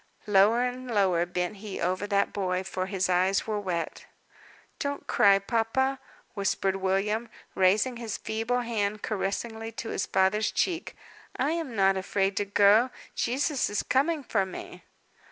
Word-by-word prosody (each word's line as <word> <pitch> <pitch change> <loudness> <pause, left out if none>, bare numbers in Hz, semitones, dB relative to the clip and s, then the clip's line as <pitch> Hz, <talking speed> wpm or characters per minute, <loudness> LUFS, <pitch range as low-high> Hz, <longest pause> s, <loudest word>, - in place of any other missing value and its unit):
Lower 210 +4 +4
and 250 0 -4
lower 185 -6 +2
bent 180 +3 -3
he 200 -1 -7
over 185 +3 -1
that 200 -1 +1
boy; 185 -2 -1
for 185 0 -3
his 190 -1 0
eyes 185 +2 +2
were 215 -1 -2
wet. 180 -4 -4 0.7
"Don't 285 0 -3
cry, 200 -1 +5
papa," 235 +6 0 0.3
whispered 195 -1 0
William, 200 +4 0 0.2
raising 205 +7 +2
his 230 -3 -4
feeble 225 +3 -1
hand 215 -3 -2
caressingly 220 +2 -3
to 225 0 -6
his - - -2
father's 190 +3 +2
cheek, 350 -1 -1 0.4
"I 275 +4 0
am 325 -8 -3
not 195 -1 +3
afraid 195 +1 0
to 205 - +1
go. 205 +4 +5 0.2
Jesus 270 +3 0
is 205 - -1
coming 290 +3 +1
for 210 -5 +1
me." 190 -1 -8
205 Hz, 150 wpm, -27 LUFS, 195-235 Hz, 0.7 s, cry